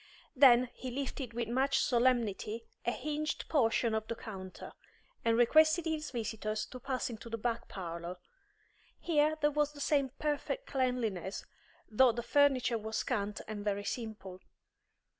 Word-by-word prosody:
Then 250 -2 +6
he 255 - -6
lifted 265 -1 -4
with 235 -1 -2
much 265 +3 +2
solemnity 235 -3 +1 0.2
a - - +4
hinged 300 +4 -3
portion 235 -5 +2
of 220 0 -1
the 230 - -3
counter, 190 -5 -8 0.5
and 230 0 +3
requested 315 +7 +5
his 310 -1 -2
visitors 215 -2 -3
to 255 - -7
pass 255 0 -2
into 230 +1 -8
the 230 - -3
back 235 +1 -2
parlour. 170 -1 -6 0.8
Here 310 -2 +2
there 295 0 +3
was 295 0 +1
the 290 - -12
same 280 -2 +2
perfect 305 - -2
cleanliness, 235 -8 -1 0.4
though 240 +2 +4
the 235 +1 -4
furniture 255 -4 +3
was 220 +1 -4
scant 205 +1 -2
and 210 -1 -5
very 205 -1 -1
simple. 215 -6 -5
240 Hz, 145 wpm, -33 LUFS, 220-280 Hz, 0.8 s, Then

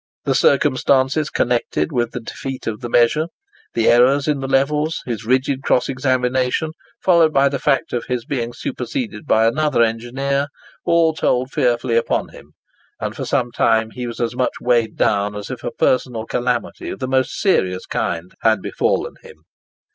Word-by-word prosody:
The 135 - +2
circumstances 135 +1 +2
connected 120 -10 0
with 120 -2 0
the 125 - -6
defeat 130 +3 -7
of 110 +1 -4
the 120 - -5
measure, 120 +8 +3 0.5
the 115 - +2
errors 130 +4 +4
in 150 -2 +1
the 135 - -4
levels, 150 +4 +1
his 115 -4 -4
rigid 130 +2 +1
cross 125 - +2
examination, 130 +2 0 0.3
followed 170 -4 +4
by 140 -1 +4
the 140 -1 -3
fact 135 - 0
of 120 -2 -2
his 125 -2 -3
being 120 -4 -2
superseded 240 - -5
by 110 -4 +4
another 135 0 +2
engineer, 130 +5 -1 0.4
all 170 -2 +3
told 130 -4 0
fearfully 120 -3 +1
upon 115 - 0
him, - - -15 0.5
and - - -4
for - - -4
some 125 -4 0
time 110 -1 +2
he 125 0 -5
was 115 - -7
as 120 0 -1
much 125 0 0
weighed 120 -3 +1
down 105 0 +1
as 105 -1 -6
if - - -7
a - - -2
personal 125 -3 0
calamity 125 +1 -2
of - - -5
the 130 - -4
most 130 0 0
serious 95 - +1
kind 85 +2 -3
had 110 -2 +3
befallen - - -1
him. 75 - -16
125 Hz, 170 wpm, -20 LUFS, 115-140 Hz, 0.5 s, errors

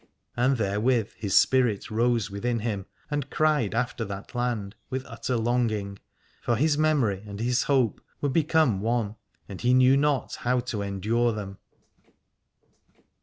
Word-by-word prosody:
And 125 +2 +2
therewith 110 +2 +1
his 100 -3 +1
spirit 125 -7 +2
rose 115 -1 +1
within 115 +3 -2
him 105 -4 -3 0.2
and 145 -2 -2
cried 150 -9 +1
after 120 -1 -1
that 100 +3 -8
land 120 -5 -2 0.2
with 130 0 -3
utter 120 +1 -3
longing, 110 -4 -1 0.4
for 120 - +1
his 150 +4 +2
memory 145 -11 +1
and 100 0 -7
his 125 +2 +1
hope 130 -5 +1 0.2
were 145 - 0
become 155 - +2
one, 110 -1 -1 0.3
and 100 - -8
he 125 +1 +3
knew 130 +1 +6
not 145 -2 0
how 125 +1 +1
to 110 -3 -4
endure 110 +4 0
them. 100 -2 -7
120 Hz, 145 wpm, -26 LUFS, 105-130 Hz, 0.4 s, knew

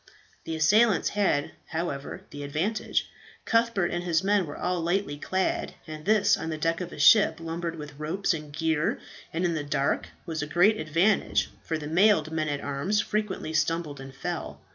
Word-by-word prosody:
The 165 - -3
assailants 195 +5 +4
had, 195 -8 +1 0.2
however, 160 -4 -4
the 145 - -7
advantage. 160 +10 -1 0.4
Cuthbert 230 -6 +2
and 175 0 -2
his 170 0 +1
men 200 -3 +2
were 145 - -7
all 180 -1 -1
lightly 175 -1 0
clad, 190 +5 -1
and 155 -2 -8
this 215 0 +4
on 160 - -5
the 155 - -3
deck 165 +3 0
of 175 - -5
a - - -9
ship 160 +2 +6
lumbered 165 0 -4
with 150 -2 -9
ropes 170 +6 0
and 150 -2 -6
gear, 160 0 0 0.3
and 170 +3 -1
in 170 - +1
the 155 -2 -2
dark, 145 -1 0 0.2
was 160 -3 -3
a 150 - -3
great 195 +8 +4
advantage, 165 +7 +1
for 160 - -2
the 150 - -7
mailed 165 0 +3
men 155 -1 -1
at 145 -1 -2
arms 145 +9 -1
frequently 205 -7 -2
stumbled 155 -1 0
and 135 0 -10
fell. 135 - -5
165 Hz, 185 wpm, -27 LUFS, 150-190 Hz, 0.4 s, ship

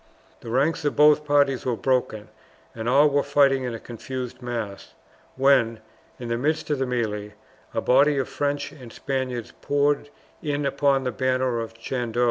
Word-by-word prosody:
The 115 - -9
ranks 140 +7 +1
of 145 - 0
both 150 0 +5
parties 145 -3 +2
were 125 -2 0
broken, 110 -4 -1 0.4
and 115 +1 -3
all 145 +4 +6
were 145 0 +2
fighting 140 -2 +3
in 120 -2 -3
a - - -7
confused 125 +2 -7
mass, 115 -5 -5 0.4
when, 130 -4 +3 0.4
in 120 - -7
the 115 0 -1
midst 155 +3 -1
of 145 - 0
the 135 - 0
melee, 105 -4 -3 0.4
a - - -2
body 140 +3 +4
of 135 - 0
French 145 0 -2
and 125 -5 -12
Spaniards 130 -3 -4
poured 145 0 +1 0.3
in 145 -1 -2
upon 140 -1 +2
the 125 - -1
banner 130 0 0
of 115 0 -6
Chandos. 120 0 -3
130 Hz, 170 wpm, -24 LUFS, 120-145 Hz, 0.4 s, all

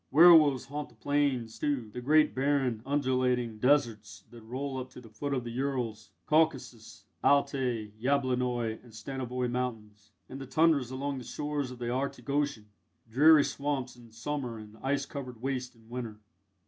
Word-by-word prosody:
Werwolves 155 -4 +7
haunt 145 +2 -5
the 120 - -22
plains, 130 -3 -1
too 135 -7 -1
the 125 - -5
great 150 +4 +4
barren, 135 -4 +1
undulating 125 -5 0
deserts 110 -7 +1
that 120 -1 -12
roll 130 +4 -4
up 130 0 -6
to - - -12
the 115 -3 -14
foot 140 +6 -4
of 130 -3 -1
the 120 - -6
Urals, 120 -4 -3 0.2
Caucasus, 130 -8 0 0.2
Altai, 130 -6 +1
Yablonoi, 125 -4 0
and 120 -3 -16
Stanovoi 125 +2 -3
Mountains 110 -5 -5 0.2
and 135 +1 -8
the 135 - -7
Tundras 150 -2 +3
along 135 +1 -3
the - - -8
shores 145 0 -3
of 125 - -9
the 120 0 -3
Arctic 135 +2 -3
Ocean 140 -7 -1 0.4
dreary 145 +6 +6
swamps 140 -4 -3
in 120 -2 -16
summer 120 0 -4
and 105 0 -11
ice 140 +1 0
covered 130 -5 -7
wastes 130 -1 -3
in 115 -1 -22
winter. 115 -3 -6
125 Hz, 160 wpm, -30 LUFS, 115-140 Hz, 0.4 s, Werwolves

